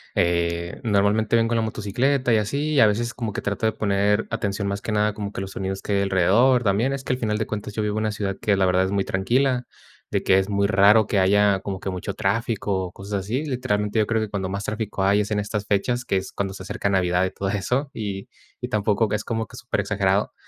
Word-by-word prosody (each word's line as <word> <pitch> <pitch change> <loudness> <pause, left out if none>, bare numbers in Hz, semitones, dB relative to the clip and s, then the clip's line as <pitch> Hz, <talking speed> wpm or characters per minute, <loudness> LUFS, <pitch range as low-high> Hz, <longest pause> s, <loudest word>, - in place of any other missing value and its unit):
eh, 85 +1 0
normalmente 105 0 +2
vengo 115 0 +2
en - - +2
la - - +2
motocicleta 120 +5 0
y 110 - +5
así, 140 +9 -1
y 145 - +3
a 110 - +7
veces 120 +3 -1
como 115 -4 -4
que - - -3
trato 105 +2 -1
de - - +2
poner 105 -1 +1
atención 100 0 -2
más 100 0 -3
que - - -4
nada 105 0 +1
como 100 -1 -5
que - - -5
a - - -2
los 95 - -7
sonidos 95 0 -4
que 100 - -2
hay - - +2
alrededor 100 +7 +3
también. 105 +5 +1
Es 135 -1 -4
que 130 - -1
al 125 - -3
final 105 -3 0
de 110 - -1
cuentas 105 0 -5
yo 110 - -1
vivo 105 0 -1
en 110 - -1
una 110 - 0
ciudad 100 -2 -3
que 100 -2 +2
la 95 - +3
verdad 90 0 +3
es 95 - -3
muy 100 -1 +1
tranquila, 125 +6 +1 0.4
de - - 0
que 95 0 +4
es 95 +1 -2
muy 100 0 +1
raro 105 +2 +5
que 100 -1 +1
haya 100 +1 +4
como 95 0 -5
que 95 - -4
mucho 95 +2 -5
tráfico 100 -2 -1
o 90 - -8
cosas 100 +2 -4
así. 120 +10 -2
Literalmente, 115 -6 -1
yo 105 - +2
creo 115 -1 +1
que 110 - -1
cuando 95 -2 -3
más 100 +1 -3
tráfico 105 -2 -3
hay 100 +2 +4
es 105 - -3
en 105 -1 0
estas 105 0 -3
fechas, 120 +5 0
que 120 - -1
es 95 - -4
cuando 95 -1 -3
se 95 - -8
acerca 100 +1 -2
Navidad 90 -2 +2
y - - -1
todo 95 - -3
eso. 125 +8 -1
Y 100 -3 -5 0.3
y - - -5
tampoco 105 +1 +1
que 105 - -1
es 105 - -3
como 110 -1 -2
que - - -13
superexagerado, - - 0
105 Hz, 260 wpm, -23 LUFS, 95-110 Hz, 0.4 s, a